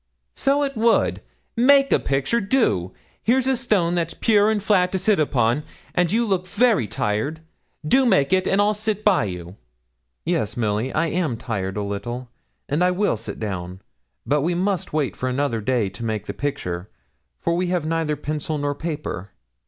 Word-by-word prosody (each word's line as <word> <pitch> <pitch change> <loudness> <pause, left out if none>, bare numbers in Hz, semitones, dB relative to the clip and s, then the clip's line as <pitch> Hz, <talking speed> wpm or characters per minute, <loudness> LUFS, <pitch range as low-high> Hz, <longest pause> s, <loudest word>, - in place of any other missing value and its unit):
'So 280 +1 +1
it 275 -1 -2
would. 230 +1 +2 0.3
Make 275 +3 +5
a - - +4
picture 140 - 0
do! 195 - +1 0.3
here's 255 +3 +2
a 265 0 +2
stone 210 -9 +1
that's 170 -2 -1
pure 210 -2 +3
and 215 -2 0
flat 185 -4 +3
to - - +2
sit 195 +1 +2
upon, 130 -3 +2 0.3
and 175 -1 +2
you 230 +2 +2
look 185 -4 -1
very 215 - +2
tired. 110 +12 -2 0.5
Do 260 - +4
make 190 -6 +3
it, 185 0 +2
and 195 - +2
I'll 205 +1 +4
sit 215 0 -2
by 195 - +4
you.' 90 0 -7 0.7
'Yes, 110 +3 -1
Milly, 110 +2 0
I 160 - +1
am 160 -9 -1
tired, 95 -4 -3
a 105 - -1
little, 120 +5 -5 0.4
and 150 +5 +1
I 180 - +4
will 195 - +1
sit 110 +1 -7
down; 95 -3 -4 0.5
but 145 0 +2
we 170 +4 0
must 185 0 -1
wait 150 -3 -1
for 130 - -2
another 125 -3 -1
day 115 -1 +1
to 95 +5 -9
make 110 -2 -2
the - - -5
picture, 90 -10 -4 0.5
for 170 - 0
we 180 +1 0
have 175 -3 0
neither 160 -1 0
pencil 150 +1 -3
nor 145 0 -1
paper. 150 - -5
160 Hz, 185 wpm, -23 LUFS, -, 0.7 s, Make